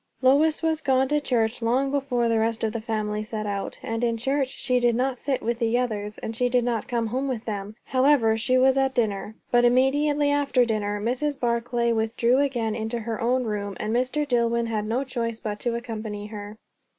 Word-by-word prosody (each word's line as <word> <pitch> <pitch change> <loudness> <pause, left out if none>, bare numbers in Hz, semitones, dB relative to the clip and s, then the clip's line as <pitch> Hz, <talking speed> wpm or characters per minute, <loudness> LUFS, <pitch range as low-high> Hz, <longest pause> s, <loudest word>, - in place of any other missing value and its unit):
Lois 295 +5 +4
was 320 -1 +1
gone 265 -2 +2
to 295 +2 +1
church 235 -4 0
long 255 +4 +1
before 265 -4 0
the 230 -1 +2
rest 225 0 -1
of 220 -1 0
the 230 - -3
family 215 -1 -2
set 215 0 -4
out; 200 -1 -3
and 225 +1 -3
in 230 -1 +1
church 270 +3 0
she 250 -1 0
did 240 -1 +2
not 255 0 0
sit 270 -2 -2
with 235 +1 -1
the 230 0 +1
others; 210 -4 -2
and 225 - -5
she 245 +2 +1
did 245 -1 +2
not 235 -2 -1
come 235 -2 -1
home 255 +5 -2
with 245 -4 -3
them. 205 -1 -5
However, 255 -4 +3
she 255 +3 +1
was 265 +1 +4
at 270 0 +1
dinner. 215 -2 -1 0.2
But 240 0 +4
immediately 285 +4 +3
after 280 -3 +2
dinner 210 -2 -1
Mrs. 260 +6 -1
Barclay 235 0 0
with 220 0 -1
drew 240 +3 +3
again 245 -6 0
into 225 +2 -3
her 225 -1 -4
own 250 +2 +2
room, 205 -3 -3
and 215 +1 -2
Mr. 255 +5 0
Dillwyn 235 -2 +1
had 215 -2 -2
no 240 +5 0
choice 230 -4 -3
but 210 -1 -4
to 235 +1 -1
accompany 220 -3 -5
her. 210 0 -8
235 Hz, 210 wpm, -25 LUFS, 220-260 Hz, 0.2 s, Lois